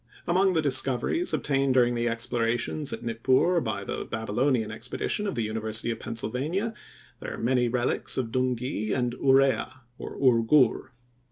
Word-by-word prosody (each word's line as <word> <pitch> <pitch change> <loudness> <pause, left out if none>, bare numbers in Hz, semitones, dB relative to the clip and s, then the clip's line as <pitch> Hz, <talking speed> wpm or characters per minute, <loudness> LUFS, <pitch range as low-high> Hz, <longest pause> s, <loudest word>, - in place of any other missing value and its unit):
Among 185 +2 +3
the 160 -2 +1
discoveries 135 - +1
obtained 135 -2 +1
during 120 -1 +4
the 120 0 0
explorations 120 +4 -1
at - - -6
Nippur, 130 +9 +2
by 110 -5 -3
the - - -4
Babylonian 110 +1 -1
expedition 125 - -3
of 195 - -3
the 115 - -1
University 110 +1 -1
of 115 - -5
Pennsylvania, 145 - -3 0.5
there - - -6
are - - -10
many 125 +1 +1
relics 120 +1 0
of 120 -4 -2
Dungi 125 -3 -1
and 125 -2 -1
Urea, 135 -1 +2 0.2
or - - -7
Ur 125 -4 +4
Gur. 125 +1 +3
125 Hz, 155 wpm, -27 LUFS, 115-135 Hz, 0.5 s, during